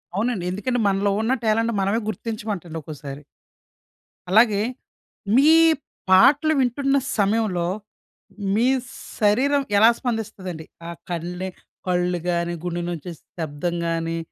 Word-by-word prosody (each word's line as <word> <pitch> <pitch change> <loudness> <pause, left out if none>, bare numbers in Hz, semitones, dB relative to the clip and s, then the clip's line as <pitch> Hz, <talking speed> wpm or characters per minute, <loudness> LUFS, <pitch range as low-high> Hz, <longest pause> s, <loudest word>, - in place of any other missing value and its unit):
అవునండి. 210 -3 -1
ఎందుకంటే 225 +6 -1
మనలో 200 +1 +1
ఉన్న 225 +4 +1
టాలెంట్ 225 +2 +2
మనమే 200 +4 +1
గుర్తించమంటండి 210 -7 -5
ఒక్కోసారి. 145 -1 -8 1.1
అలాగే 210 +1 +5 0.7
మీ 280 +4 +6 0.6
పాటలు 285 +11 +6
వింటున్న 275 +2 +1 0.2
సమయంలో 200 -4 +1 0.9
మీ 225 +4 +2 0.5
శరీరం 265 +7 +3
ఎలా 220 +3 +7
స్పందిస్తదండి? 195 -8 -4 0.2
ఆ - - -5 0.2
కళ్ళే 175 +2 -4 0.4
కళ్ళు 180 0 +1
గానీ, 170 0 0
గుండె 175 -1 -2
నుంచి 175 +1 -6 0.3
శబ్దం 160 +2 -3
గానీ 165 0 -1
195 Hz, 105 wpm, -23 LUFS, 175-225 Hz, 1.1 s, ఎలా